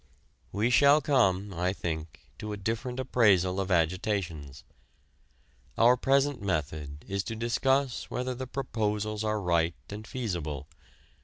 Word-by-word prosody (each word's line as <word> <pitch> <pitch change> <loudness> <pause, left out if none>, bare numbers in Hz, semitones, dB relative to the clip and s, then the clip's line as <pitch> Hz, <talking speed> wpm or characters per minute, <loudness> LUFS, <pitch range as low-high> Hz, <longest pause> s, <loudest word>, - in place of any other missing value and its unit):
We 110 +5 +1
shall 140 +3 +6
come, 100 -9 +2
I 90 +2 0
think, 80 -4 -5 0.2
to 105 0 -5
a - - -5
different 115 +5 -3
appraisal 100 -8 +3
of 95 0 -2
agitations. 85 -4 -1 1.1
Our 120 +2 +6
present 135 +1 +2
method 75 -5 -3
is 100 0 -2
to 115 - -4
discuss 130 +3 0
whether 125 +1 -2
the 130 +1 -6
proposals 110 -5 -2
are 110 0 0
right 85 -3 +1 0.2
and 105 +1 -7
feasible. 85 - -4
105 Hz, 130 wpm, -29 LUFS, 90-125 Hz, 1.1 s, shall